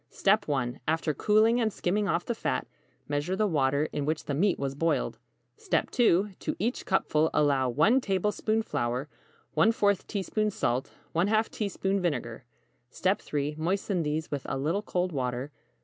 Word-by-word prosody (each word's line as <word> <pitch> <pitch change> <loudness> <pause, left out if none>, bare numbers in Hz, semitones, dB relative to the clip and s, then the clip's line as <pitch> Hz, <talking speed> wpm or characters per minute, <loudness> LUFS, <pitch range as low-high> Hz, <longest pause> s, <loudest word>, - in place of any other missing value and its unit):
1. 130 -5 -1
After 160 -1 +1
cooling 220 - +3
and 220 -1 +1
skimming 200 +2 0
off 170 0 0
the 235 - -1
fat, 220 - -2 0.4
measure 145 +6 -1
the 215 +2 +2
water 145 -4 +1
in 145 - -1
which 155 +2 -2
the 145 - -2
meat 180 +7 +2
was 135 -1 -2
boiled. 165 +4 0 0.4
2. 225 - +2
To - - -3
each 235 +7 -2
cupful, 160 -5 +2
allow 140 -4 +3
1 165 - +4
tablespoon 210 +2 0
flour, 125 - -2 0.5
¼ 200 +2 +3
teaspoon 215 +1 -1
salt, 125 -9 -1 0.3
½ 215 +6 +2
teaspoon 200 -1 -1
vinegar. 130 -9 -2 0.5
3. 150 -6 -1
Moisten 185 +2 0
these 155 0 -2
with 145 -2 -2
a - - -1
little 160 +9 0
cold 180 -3 -1
water. 130 -1 -3
170 Hz, 150 wpm, -28 LUFS, 145-205 Hz, 0.5 s, 1